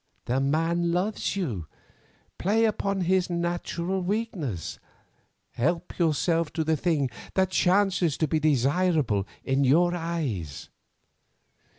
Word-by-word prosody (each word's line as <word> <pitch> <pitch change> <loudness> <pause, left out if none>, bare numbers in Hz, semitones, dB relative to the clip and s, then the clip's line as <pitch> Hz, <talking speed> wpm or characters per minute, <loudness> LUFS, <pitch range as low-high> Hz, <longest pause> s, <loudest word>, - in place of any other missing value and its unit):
The 125 +2 0
man 165 +5 +1
loves 190 +5 -1
you, 115 - -3 0.7
play 220 +5 +3
upon 200 -3 0
his 180 +1 +2
natural 175 +1 -2
weakness. 180 - -3 0.7
Help 170 +9 -2
yourself 165 0 +1
to 160 - 0
the 160 0 +1
thing 145 -4 0 0.2
that 190 -1 +2
chances 185 -4 +2
to 155 - +1
be 155 +2 +1
desirable 145 - +2 0.2
in 135 +1 +1
your 170 +7 +4
eyes. 155 - -3
170 Hz, 110 wpm, -26 LUFS, 140-180 Hz, 0.7 s, your